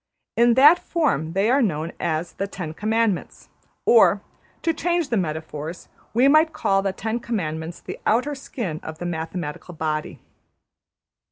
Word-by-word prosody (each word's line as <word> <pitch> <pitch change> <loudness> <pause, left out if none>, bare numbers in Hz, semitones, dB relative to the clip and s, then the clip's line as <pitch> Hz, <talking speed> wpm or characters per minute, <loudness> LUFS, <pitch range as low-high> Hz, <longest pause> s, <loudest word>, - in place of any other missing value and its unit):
In 235 0 +4
that 295 +7 +8
form 165 - 0
they 195 +3 +2
are 275 +2 +4
known 165 -7 -1
as 165 0 -2
the 195 - -3
Ten 180 -5 -6
Commandments; 215 +1 -1 0.4
or, 465 +1 +6 0.4
to 330 - +2
change 345 -1 0
the 235 - +1
metaphors, 160 -2 -4 0.2
we 245 +4 +4
might 310 +3 +5
call 195 0 +1
the 195 0 0
Ten 220 +4 -3
Commandments 165 -8 -4
the - - -8
outer 255 +7 +2
skin 230 - -5
of 160 0 -7
the 175 - -6
mathematical 165 0 -5
body. 155 -1 -3
195 Hz, 150 wpm, -23 LUFS, 160-250 Hz, 0.4 s, that